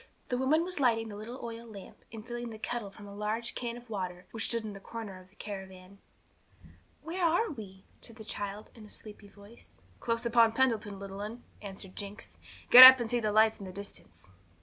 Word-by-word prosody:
The 250 - 0
woman 300 +5 +3
was 360 -2 -4
lighting 225 -4 +2
the 205 - -8
little 230 +5 -8
oil 230 0 -8
lamp, 200 -4 -12
and 220 -1 -9
filling 240 -1 -5
the 220 - -9
kettle 230 -2 -4
from 205 +1 -13
a 200 - -10
large 215 +3 -2
can 240 -1 -4
of 240 0 -14
water, 180 -4 -5
which 225 -2 -4
stood 230 -1 -1
in 215 -1 -6
the 195 - -9
corner 200 -3 -8
of 185 - -20
the 190 - -28
caravan. 190 -2 -9 1.0
'Where 350 +3 -4
are 345 +7 +2
we?' 195 -7 -10 0.2
said 230 - -10
the 220 -2 -11
child, 205 0 -6
in 225 - -14
a - - -14
sleepy 210 -1 -10
voice. 205 +3 -15 0.2
'Close 230 0 -2
upon 230 -1 +4
Pendleton, 225 -5 0
little 195 0 -8
'un,' 220 +4 -7 0.2
answered 195 -1 -8
Jinx. 195 - -8 0.3
'Get 250 +1 +13
up 260 0 +12
and 235 -1 -3
see 245 - +1
the 215 -2 -1
lights 220 +1 +4
in 195 - -8
the - - -7
distance.' 135 - -10
220 Hz, 215 wpm, -30 LUFS, 200-235 Hz, 1.0 s, Get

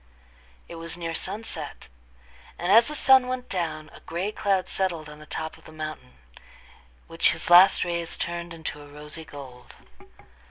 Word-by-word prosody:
It 170 - -9
was 165 +1 -4
near 165 -1 -4
sunset, 205 +6 -4 0.7
and 175 +2 0
as 230 +3 +7
the 300 - -3
sun 265 -2 +6
went 255 0 -3
down, 155 -4 -3
a - - -12
gray 185 +5 -3
cloud 195 -3 0
settled 175 -5 -1
on 150 0 -11
the 150 - -13
top 160 +1 -5
of - - -22
the - - -12
mountain, 155 - -7 0.9
which - - +3
his - - -5
last 185 +2 +8
rays 170 -1 -3
turned 170 0 -3
into 160 -3 -6
a 145 - -12
rosy 150 +2 -6
gold. 130 -5 -11
170 Hz, 165 wpm, -26 LUFS, 155-190 Hz, 0.9 s, last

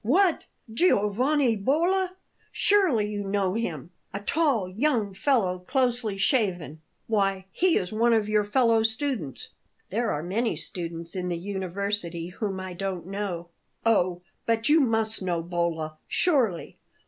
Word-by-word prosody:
"What! 345 - +3 0.3
Giovanni 250 - +2
Bolla? 350 - +1 0.4
Surely 350 - +3
you 205 -1 -3
know 195 -1 0
him 175 - -4 0.2
a 200 - -4
tall 250 - +1
young 220 0 0
fellow, 195 -4 +1
closely 240 0 0
shaven. 185 - 0 0.2
Why, 195 -3 0
he 360 - +2
is 180 - -2
one 230 +2 +2
of 220 -2 +2
your 210 0 +2
fellow 230 +1 +3
students." 220 - -2 0.4
"There 225 +3 0
are 150 - -2
many 215 +4 -1
students 165 +2 -4
in 180 -1 -2
the 175 - -1
university 190 -2 -2
whom 195 0 -4
I 185 -1 -6
don't 185 -1 -4
know." 190 -3 -4 0.4
"Oh, 180 -5 +2 0.2
but 230 0 +1
you 310 +2 +6
must 225 -5 +1
know 175 -3 -1
Bolla, 165 -3 -2
surely! 255 - +1
205 Hz, 135 wpm, -26 LUFS, 180-240 Hz, 0.4 s, you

